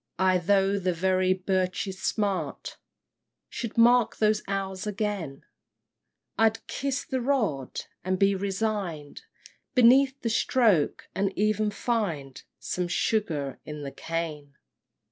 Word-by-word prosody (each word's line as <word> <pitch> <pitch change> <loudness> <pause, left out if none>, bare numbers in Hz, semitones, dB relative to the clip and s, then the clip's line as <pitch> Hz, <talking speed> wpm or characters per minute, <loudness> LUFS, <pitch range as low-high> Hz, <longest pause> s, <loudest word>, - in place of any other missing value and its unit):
Ay, 185 0 +3
though 195 +2 +2
the 185 -1 0
very 185 +1 +2
birch's 185 0 -1
smart 200 -3 -2 0.7
Should 230 -2 -5
mark 240 0 +5
those 215 -1 +2
hours 195 0 -3
again; 200 -9 -3 1.0
I'd 225 0 +2
"kiss 275 -1 -3
the 260 -1 -2
rod," 215 - -1 0.2
and 185 0 0
be 195 +1 +4
resign'd 195 -6 -3 0.5
Beneath 265 +2 +5
the 230 - 0
stroke, 220 - +2
and 195 0 0
even 215 +1 +1
find 195 - -2 0.2
Some 180 -1 -3
sugar 165 - -1
in 150 -1 -7
the 140 - -5
cane! 155 -4 -5
195 Hz, 115 wpm, -27 LUFS, 175-215 Hz, 1.0 s, mark